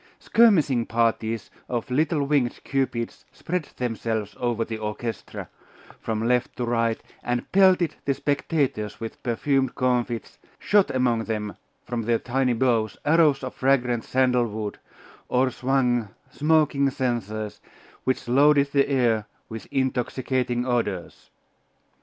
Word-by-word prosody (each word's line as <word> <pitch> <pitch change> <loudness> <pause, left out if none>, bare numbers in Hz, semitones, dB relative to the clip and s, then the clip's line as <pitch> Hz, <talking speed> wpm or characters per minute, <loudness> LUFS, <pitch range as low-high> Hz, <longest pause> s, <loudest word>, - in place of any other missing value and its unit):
Skirmishing 160 - +3
parties 115 -1 0 0.2
of 120 0 -3
little 150 +2 +1
winged 140 -4 +1
cupids 130 -4 -2
spread 180 -2 -3
themselves 110 -4 -2
over 120 -2 0
the 110 -1 -5
orchestra, 110 +1 -5 0.5
from 110 0 -2
left 125 0 +1
to 125 - -2
right, 115 -1 +1 0.2
and 120 0 -3
pelted 185 -4 +4
the 140 - +1
spectators 140 - -1
with 115 -1 -7
perfumed 130 +2 0
comfits, 125 -2 -1 0.2
shot 205 -2 +3
among 120 -3 +1
them 105 -2 -3 0.3
from 120 -1 -2
their 115 +1 +1
tiny 125 +1 0
bows 115 -3 +1
arrows 150 -3 +4
of 130 - -4
fragrant 125 -3 +1
sandal 125 -2 +2
wood, 105 -1 -5 0.5
or 130 +1 +2
swung 125 -4 +1 0.2
smoking 150 -2 +2
censers, 110 -5 -3 0.4
which 130 -2 -1
loaded 140 +2 +4
the 140 0 +2
air 115 -6 +2 0.2
with 110 -1 -7
intoxicating 125 -1 -1
odours. 110 -8 -2
125 Hz, 125 wpm, -25 LUFS, 115-135 Hz, 0.5 s, pelted